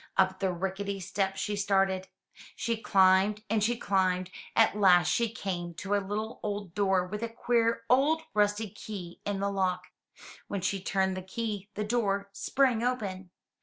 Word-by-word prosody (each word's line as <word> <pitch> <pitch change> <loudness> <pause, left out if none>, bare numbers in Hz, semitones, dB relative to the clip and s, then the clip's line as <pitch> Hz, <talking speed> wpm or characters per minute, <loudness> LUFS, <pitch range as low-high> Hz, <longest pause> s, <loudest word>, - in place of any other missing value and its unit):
Up 190 0 +3
the 190 -2 +1
rickety 195 +2 -3
steps 195 +1 -2
she 205 - -1
started. 195 -2 +1 0.5
She 230 - -1
climbed 195 0 +3
and 220 -2 +2
she 235 +2 +1
climbed 185 -3 +1 0.2
and - - +6
at - - -13
last 180 -4 +5
she 235 -3 +1
came 175 -5 -4
to 195 +5 -3
a 205 - +3
little 210 +3 -4
old 205 -4 -4
door 190 -2 +2
with 210 +4 -5
a 230 - -2
queer 230 0 +1
old 290 +6 +3
rusty 210 0 +1
key 185 -5 -8
in 200 -1 -1
the 200 0 0
lock. 190 -2 0 0.6
When 200 - -3
she 195 +1 -1
turned 190 0 0
the 185 - -4
key, 205 +1 -4
the 210 - -2
door 200 -3 0
sprang 250 +2 +1
open. 200 -7 -2
200 Hz, 170 wpm, -29 LUFS, 190-215 Hz, 0.6 s, and